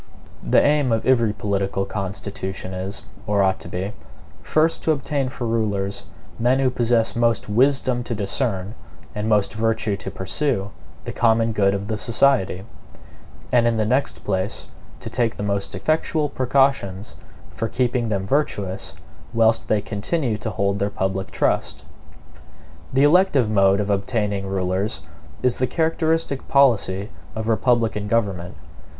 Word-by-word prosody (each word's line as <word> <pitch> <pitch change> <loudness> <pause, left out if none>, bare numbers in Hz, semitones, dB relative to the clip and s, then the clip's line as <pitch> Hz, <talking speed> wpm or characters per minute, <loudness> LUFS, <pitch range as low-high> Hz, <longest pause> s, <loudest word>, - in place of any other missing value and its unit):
The - - +4
aim 145 -3 +3
of 115 0 0
every 120 -4 +3
political 100 -2 -1
constitution 95 -1 -5
is, 95 +2 -5 0.2
or 100 -1 +3
ought 95 0 +1
to - - -10
be, 95 +3 -4 0.5
first 160 +1 +2
to 160 - +2
obtain 140 -2 -1
for 125 -1 -5
rulers 105 -4 -1 0.3
men 125 +3 +3
who 135 -1 +2
possess 120 -2 +1
most 115 -1 +1
wisdom 125 +2 +2
to 120 - -3
discern, 100 -1 -1 0.4
and 105 +1 -2
most 105 -2 +2
virtue 110 -1 0
to 95 - -6
pursue, 100 +2 -1 0.3
the - - -4
common 115 -1 +2
good 100 -2 +2
of 100 0 -3
the 110 0 -3
society; 115 -6 +2 0.9
and 120 -1 +5
in 115 -1 +1
the 110 - +1
next 130 +5 0
place, 95 0 -2 0.4
to - - -6
take 120 -1 0
the - - -4
most 100 -1 -2
effectual 155 -1 0
precautions 130 -7 0 0.4
for 115 - -3
keeping 120 -1 0
them 100 -3 -1
virtuous 100 -7 -1 0.4
whilst 115 0 +3
they 105 -1 +2
continue 115 +5 -2
to 110 +1 -4
hold 100 0 -1
their 100 - 0
public 95 -1 -2
trust. - - -1 1.1
The 135 +2 +3
elective 145 - +4
mode 100 -1 +4
of 105 0 -1
obtaining 100 -1 -1
rulers 95 +2 -1 0.4
is 125 -1 +2
the 130 - +2
characteristic 160 -3 0
policy 110 -7 +2 0.2
of 110 0 -3
republican 115 -2 +1
government. 100 -6 -1
110 Hz, 145 wpm, -22 LUFS, 100-125 Hz, 1.1 s, and